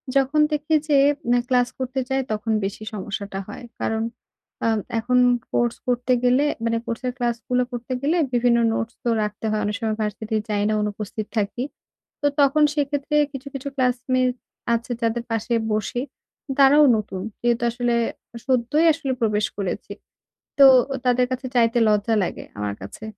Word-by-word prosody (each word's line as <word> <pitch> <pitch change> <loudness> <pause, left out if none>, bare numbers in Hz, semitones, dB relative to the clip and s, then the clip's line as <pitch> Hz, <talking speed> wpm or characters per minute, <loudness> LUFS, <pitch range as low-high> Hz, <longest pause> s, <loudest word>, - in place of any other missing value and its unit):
যখন 275 +3 +2
দেখি 300 +1 +1
যে 290 -2 +4 0.3
না, 245 - +4
ক্লাস 245 -1 +3
করতে 260 +1 -2
যাই 265 0 +1
তখন 215 +1 -2
বেশি 205 +2 -5
সমস্যাটা 200 -1 -5
হয়। 210 - -9 0.2
কারণ 225 0 0 0.6
আ - - +3 0.3
এখন 250 +2 +1 0.3
কোর্স 240 -1 +1
করতে 250 +1 +1
গেলে 255 +4 +4 0.2
মানে 230 0 +1
কোর্সের 245 +2 -3
ক্লাসগুলো 245 +1 0
করতে 245 +1 -5
গেলে 315 +5 +1 0.2
বিভিন্ন 240 0 +3
নোটস 225 +1 -2
তো 240 - 0
রাখতে 210 +1 -5
হয়। 215 0 0
অনেক 210 0 -1
সময় 220 -1 -1
ভার্সিটি 215 +1 -3
যাই 205 -1 0
না, - - +1
অনুপস্থিত 210 +1 -4
থাকি। 215 +4 -1 0.6
তো 290 - +3
তখন 285 +2 +4
সেক্ষেত্রে 290 0 -1 0.2
কিছু, 270 0 -8
কিছু 275 +1 -5
ক্লাসমেইট 255 0 +1 0.4
আছে 235 +1 -2
যাদের 230 +1 0
পাশে 225 +2 -1 0.2
বসি, 215 +3 -1 0.6
তারাও 290 +2 +7
নতুন। 195 -3 -5 0.2
যেহেতু 240 0 +1
আসলে 240 0 0 0.5
সদ্যই 265 +5 +2
আসলে 280 -4 -3
প্রবেশ 210 -2 +2
করেছি। 195 -3 -4 0.7
তো 275 - +9 0.4
তাদের 250 0 +3
কাছে 255 +1 -3
চাইতে 235 0 +3
লজ্জা 210 +2 +2
লাগে - - -5
আমার 105 -1 -2
কাছে। 100 - -9
240 Hz, 155 wpm, -23 LUFS, 215-260 Hz, 0.7 s, তো